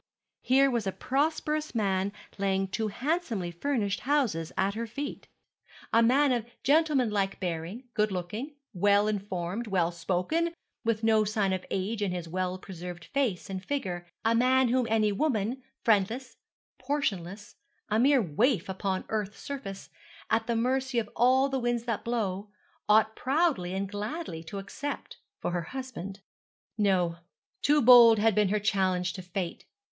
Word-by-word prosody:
here 270 +2 +4
was 235 -5 -1
a - - +1
prosperous 300 +4 -1
man 195 -2 +1 0.3
laying 195 -1 +1
two 215 +3 -2
handsomely 235 - -2
furnished 205 +1 -1
houses 245 - 0
at 195 +1 +1
her 230 +2 -4
feet 280 +6 -6 0.7
a 230 - +6
man 265 +4 +4
of 240 -3 +1 0.2
gentlemanlike 255 -10 +2
bearing, 180 +6 -4
good 210 -2 +1
looking, 210 - -4 0.2
well 205 +2 +3
informed, 200 +1 -3
well 180 -4 +1
spoken, 185 - -1 0.3
with 225 -1 0
no 220 -1 +4
signs 205 -2 0
of 185 -1 -3
age 205 +3 -2
in 200 -3 0
his 175 -2 -4
well 185 +2 -2
preserved 180 -2 -8
face 255 -10 0
and 190 -1 -5
figure; 185 -10 -3 0.2
a 225 - +4
man 255 +2 +4
whom 250 -1 +2
any 215 -1 +3
woman, 235 +1 0 0.2
friendless, 225 +4 +1 0.4
portionless, 205 -8 -3 0.4
a 215 +1 +2
mere 265 0 +5
waif 200 - +1
upon 190 0 -2
earth's 210 -2 -2
surface, 265 -9 -7 0.4
at 225 +1 +2
the 235 - 0
mercy 260 +2 0
of 225 -2 +1
all 260 +3 +4
the 270 -1 -1
winds 240 -1 0
that 230 -3 -2
blow, 210 -4 -2 0.4
ought 220 +1 +5
proudly 265 - +1
and 195 +1 -1
gladly 205 - -5
to 170 +5 -7
accept 200 +9 -6 0.2
for - - -2
her 175 0 -1
husband. 205 -3 -7 0.5
No, 185 -5 +2 0.4
too 295 -1 +4
bold 235 -2 +9
had 220 +1 +3
been 210 -1 +3
her 210 +1 +1
challenge 185 -4 +1
to 190 - -6
fate. 180 -1 -5
215 Hz, 150 wpm, -29 LUFS, 190-255 Hz, 0.7 s, bold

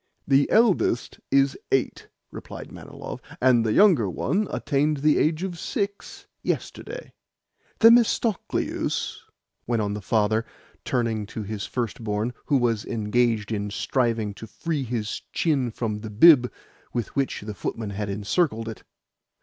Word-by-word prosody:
"The 140 0 +4
eldest 210 - +2
is 135 0 +3 0.2
eight," 135 - 0 0.2
replied - - -9
Manilov, - - -8 0.2
"and 125 -2 +4
the 110 - 0
younger 170 - +5
one 190 - 0
attained 145 +1 0
the 150 +2 +3
age 155 +3 +1
of 180 -3 -4
six 200 -3 -4 0.2
yesterday." - - -4 0.7
"Themistocleus," 230 -2 +2 0.5
went 120 -1 +1
on 100 0 -2
the 105 - -5
father, 110 +2 +1 0.4
turning 115 -4 -1
to 110 - -6
his 105 0 -5
first 120 -2 -3
born, 105 +3 -1
who 145 - +3
was 115 -4 +1
engaged 115 0 0
in 105 -1 -2
striving 115 -1 0
to 110 - -10
free 155 +5 -3
his 115 -3 -3
chin 140 -7 +1
from 110 -2 -3
the 110 0 -7
bib 125 +3 +6 0.4
with 120 -3 -3
which 135 -1 -1
the 105 +1 -6
footman 105 0 -4
had 100 0 -4
encircled 110 - 0
it. 110 - -7
120 Hz, 140 wpm, -25 LUFS, 110-150 Hz, 0.7 s, bib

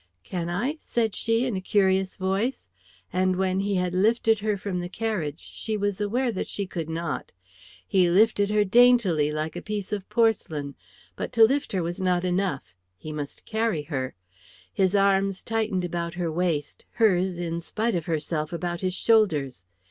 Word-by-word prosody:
"Can 175 - -4
I?" 250 - -2
said 225 -3 -1
she, 225 +4 +1
in 245 -5 -1
a 185 - -2
curious 190 -1 +2
voice; 195 +7 -2 0.4
and 185 0 +2
when 190 0 0
he 200 0 0
had 180 -1 0
lifted 220 +3 +3
her 210 -1 0
from 190 -2 -3
the 175 0 -4
carriage, 185 -9 -2
she 215 +4 -4
was 205 0 -1
aware 240 +5 0
that 190 - -3
she 200 - -1
could 165 -4 -5
not. 165 +1 -3 0.6
He 185 -3 +3
lifted 205 +2 +3
her 210 0 +3
daintily, 205 -8 +4
like 155 +1 -3
a - - -4
piece 210 -1 -4
of 200 -2 -4
porcelain; 165 - +1 0.4
but - - -4
to 225 - +6
lift 275 +5 +3
her 185 -3 0
was 175 +3 -4
not 180 -1 +1
enough, 180 - -1 0.2
he 155 +10 -8
must 145 -2 -6
carry 220 -8 -1
her. 135 -4 -4 0.6
His 190 - +2
arms 195 -1 +2
tightened 220 -5 -1
about 170 0 -3
her 175 -2 -2
waist, 160 -4 -2
hers 190 -5 +2
in 170 -1 -3
spite 220 +7 -1
of 170 -3 -2
herself 155 -1 -2
about 175 0 -3
his 185 -1 -1
shoulders. 150 - +2
190 Hz, 175 wpm, -26 LUFS, 170-215 Hz, 0.6 s, to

